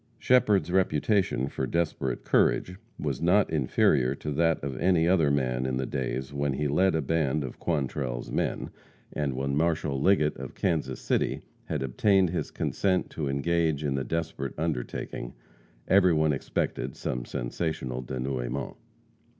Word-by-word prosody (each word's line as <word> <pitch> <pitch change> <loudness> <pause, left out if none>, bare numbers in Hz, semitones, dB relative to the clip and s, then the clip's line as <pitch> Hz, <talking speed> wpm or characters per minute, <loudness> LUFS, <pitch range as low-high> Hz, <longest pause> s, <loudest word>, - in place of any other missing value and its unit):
Shepherd's 105 -9 +3
reputation 95 - +2
for - - -3
desperate 75 -7 -1
courage 90 +1 +2 0.2
was - - -3
not 95 +3 +3
inferior 65 -2 +2
to 75 - -5
that 80 +2 +2
of 70 -2 -3
any 85 -2 +3
other 85 -5 +4
man 65 -2 0
in 65 0 -1
the 65 - -1
days 65 +2 -3
when 70 -1 0
he 75 +3 -1
led 90 +5 +3
a 80 - 0
band 75 -1 0
of 65 - -7
Quantrell's 65 -6 -2
men, - - -2 0.4
and 70 -3 -1
when 70 +1 -1
Marshal 75 -3 0
Liggett, 75 -4 +3
of - - -8
Kansas 80 -3 -1
City, - - 0 0.2
had - - -2
obtained 95 - +3
his 90 - -2
consent 95 -2 0
to 75 -4 -3
engage 80 +2 +1
in 70 -2 0
the 70 -1 -1
desperate 80 -1 -3
undertaking, 75 -5 -3 0.5
everyone 85 -6 +4
expected 70 - -2
some - - -3
sensational 65 +1 -3
denouement. 65 0 -3
75 Hz, 145 wpm, -28 LUFS, 65-85 Hz, 0.5 s, other